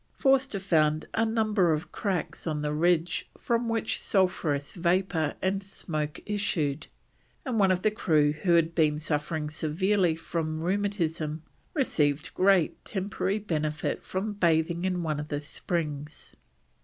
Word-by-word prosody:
Forster 270 -6 +2
found 155 -5 +2
a 225 - +2
number 215 -5 +2
of 155 +2 -2
cracks 175 -5 -3
on 150 -2 -1
the 150 0 -1
ridge 170 +1 +1
from 235 0 0
which 225 -1 -1
sulphurous 160 -7 +1
vapour 175 -3 +1
and 195 +1 +1
smoke 155 -6 -4
issued, 160 -8 -1 0.6
and 245 -5 0
one 195 -2 +5
of 185 -1 +1
the 215 - +3
crew 155 -8 +3
who 155 +4 0
had 165 0 +3
been 155 -3 +2
suffering 150 0 -2
severely 170 +4 +1
from 160 -1 -3
rheumatism 165 -5 -1 0.3
received 150 - +1
great 185 -3 +3
temporary 195 0 -2
benefit 155 -7 -2
from 200 +3 -3
bathing 170 -2 +1
in 180 -2 0
one 155 -2 -1
of 150 - -5
the 145 -1 -2
springs. 150 -1 -4
170 Hz, 140 wpm, -28 LUFS, 155-195 Hz, 0.6 s, one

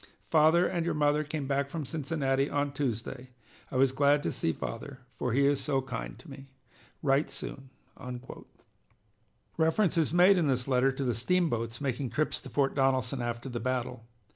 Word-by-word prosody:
Father 160 +2 +4
and 170 -2 -1
your 170 - -1
mother 150 0 +2
came 150 -1 -4
back 140 0 0
from 155 -1 -4
Cincinnati 140 -2 -1
on 145 0 0
Tuesday. 130 -1 -3 0.4
I - - -8
was 130 0 +4
glad 145 +2 +3
to - - -1
see 80 - 0
father, 130 - -6
for 125 - -3
he 140 +4 +3
is 140 -1 +2
so 140 -3 +1
kind 125 -3 -5
to - - -16
me. 135 -1 -11 0.6
Write 140 +1 +2
soon." 135 -1 -7 1.9
Reference 165 +3 +2
is 155 - +1
made 180 +2 +6
in 160 - +1
this 130 -2 0
letter 130 0 +3
to 135 +1 -4
the 125 -2 +1
steamboats 120 - 0
making 135 -2 -2
trips 150 +7 -1
to - - -10
Fort 140 -2 +1
Donelson 135 -2 +1
after 120 +1 -3
the 120 -2 -4
battle. 125 -1 -3
135 Hz, 175 wpm, -29 LUFS, 130-150 Hz, 1.9 s, made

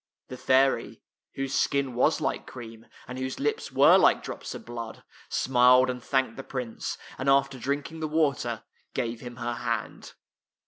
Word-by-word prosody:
The 130 - -7
fairy, 130 +1 +2 0.4
whose 135 0 -3
skin 140 -3 +1
was 120 - +2
like - - -2
cream, 115 -2 -10 0.2
and 125 +1 -6
whose 130 0 -4
lips 440 +1 -1
were - - +7
like - - +4
drops - - -6
of 225 - -9
blood, 115 -1 -7 0.3
smiled 125 0 +4
and 125 0 -7
thanked 130 -3 0
the 135 - -6
Prince, 125 -4 -5 0.2
and 135 +1 0
after 135 -1 +3
di*inking 145 +5 -3
the 155 - -2
water, 140 -7 0 0.3
gave 115 0 -2
him 120 -1 -8
her 120 0 -3
hand. 115 -1 -4
130 Hz, 165 wpm, -27 LUFS, 120-135 Hz, 0.4 s, were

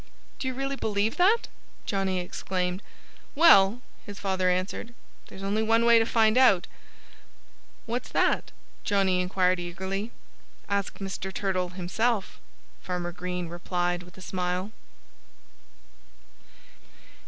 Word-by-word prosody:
"Do 260 - -3
you 260 - -2
really 275 +1 -2
believe 210 -1 0
that?" 410 +6 +4 0.4
Johnnie 195 -3 0
exclaimed. 180 +1 -3 0.5
"Well," 245 - +6 0.2
his 205 -2 -9
father 190 -2 0
answered, 185 +6 -2 0.3
"there's 190 - -10
only 205 +2 0
one 225 +1 +3
way 235 -1 +7
to 225 - +1
find 225 +1 +4
out." 200 -9 +5 1.2
"What's 240 +2 -3
that?" - - +1 0.3
Johnnie 195 -3 +2
inquired 185 0 +1
eagerly. 190 +4 -4 0.6
"Ask 200 -1 -2
Mr. 195 -1 -5
Turtle 190 -2 -1
himself," 195 +4 -1 0.4
Farmer 180 -1 -3
Green 180 0 -4
replied 175 +1 -2
with 180 0 -15
a - - -11
smile. 180 +2 -2
195 Hz, 115 wpm, -27 LUFS, 180-220 Hz, 1.2 s, way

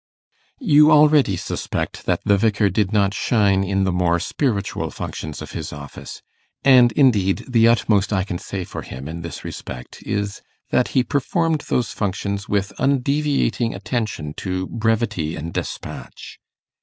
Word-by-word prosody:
You 150 - +5
already 150 - +5
suspect - - -4
that - - +1
the 100 - +4
Vicar 105 -1 +2
did 100 0 0
not 100 -2 +2
shine 100 -3 +2
in 95 0 0
the 95 - +1
more 85 -1 +1
spiritual 105 - -1
functions 75 -3 -6
of - - -10
his - - -5
office; 70 -1 -9 0.4
and 125 -3 +7
indeed, 105 -8 +3
the 115 -3 +4
utmost 105 -4 +2
I 95 -3 +1
can 90 -2 -4
say 95 -2 -5
for - - -7
him 65 +3 -8
in 85 +2 -6
this 85 -2 -7
respect 60 -1 -8
is, 100 -1 -3 0.3
that 125 - +3
he 130 - +5
performed 155 +3 0
those 125 - 0
functions 100 0 -3
with 100 0 0
undeviating 140 -4 +1
attention 105 - -3
to 95 -1 -2
brevity 110 -8 -1
and 80 +2 -6
despatch. - - -7
100 Hz, 150 wpm, -21 LUFS, 95-125 Hz, 0.4 s, and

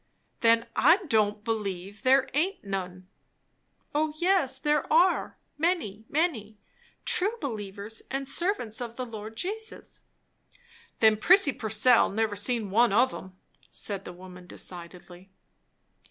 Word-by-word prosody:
"Then 230 0 +4
I 320 +7 +6
don't 210 -2 +1
believe 200 -3 -4
there 265 0 +4
aint 345 +8 -1
none." 185 -2 -5 0.9
"O 300 +1 0
yes, 345 -7 +2
there 295 +1 0
are! 350 +4 +3 0.2
Many, 300 - -1
many. 255 -10 -1 0.5
True 415 +6 +1
believers 210 -4 -6
and 270 0 -2
servants 275 - -1
of 235 -1 -6
the 255 - -4
Lord 220 -1 -8
Jesus." 440 - -5 1.0
"Then 220 -1 +6
Prissy 355 - +5
Purcell 225 +1 +3
never 215 0 -1
see 235 +5 0
one 220 +3 +2
of 245 +6 +3
'em," 185 0 -10 0.3
said 200 -2 -4
the - - -8
woman 180 0 -13
decidedly. 180 +1 -10
225 Hz, 125 wpm, -27 LUFS, 200-290 Hz, 1.0 s, I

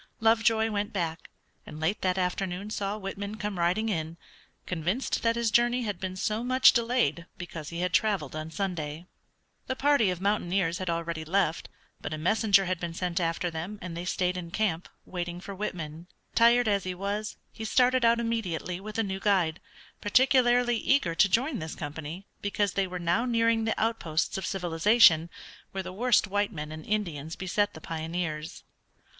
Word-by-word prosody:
Lovejoy 225 0 +3
went 205 +1 -2
back, 170 -5 -3 0.3
and 150 - -10
late 160 +6 0
that 185 0 +1
afternoon 185 +2 -2
saw 200 0 -2
Whitman 200 +1 -5
come 205 -3 -4
riding 180 +6 +1
in, 165 -5 -2 0.5
convinced 180 - -1
that 230 0 +2
his 235 -2 0
journey 240 +2 +3
had 205 -5 -3
been 185 -1 -4
so 215 +4 -1
much 255 +1 +6
delayed 230 - +1
because 165 -4 -7
he 170 +1 -4
had 180 -1 -1
traveled 195 -10 +1
on 155 +1 -5
Sunday. 165 -3 -4 0.6
The 260 - -1
party 275 -6 +3
of 180 -2 -2
mountaineers 190 -3 0
had 185 -2 -3
already 165 -1 -2
left, 170 0 0 0.3
but 155 - -4
a - - -7
messenger 200 +4 +3
had 185 -1 -1
been 170 -2 -5
sent 180 0 -1
after 170 +1 -1
them, 170 +6 -5
and 175 -2 -6
they 170 - -4
stayed 180 0 0
in 170 -2 -6
camp, 180 -3 -1 0.2
waiting 175 -1 -4
for 200 +2 -8
Whitman. 170 -5 -5 0.3
Tired 235 +1 +5
as 200 -2 +2
he 185 -1 -4
was, 205 +3 -3 0.2
he 220 - -7
started 250 +3 +3
out 235 0 +4
immediately 185 -7 -2
with 210 +2 -7
a 225 - +2
new 190 -2 -3
guide, 185 -5 +2 0.4
particularly 245 +1 +4
eager 225 -10 +2
to 195 +4 +4
join 250 - +1
this 160 0 -5
company, 160 +5 -6 0.2
because 205 -1 0
they 195 -1 +1
were 180 0 -5
now 175 +5 +1
nearing 230 -2 +2
the 225 - -1
outposts 170 -8 0
of 190 - -3
civilization, 175 -1 +4 0.4
where 190 0 -3
the 185 0 -7
worst 240 +3 +3
white 205 +1 0
men 150 -4 -6
and 155 0 -8
Indians 165 -8 -2
beset 200 +3 -1
the - - -8
pioneers. 160 -1 -4
190 Hz, 180 wpm, -28 LUFS, 170-220 Hz, 0.6 s, much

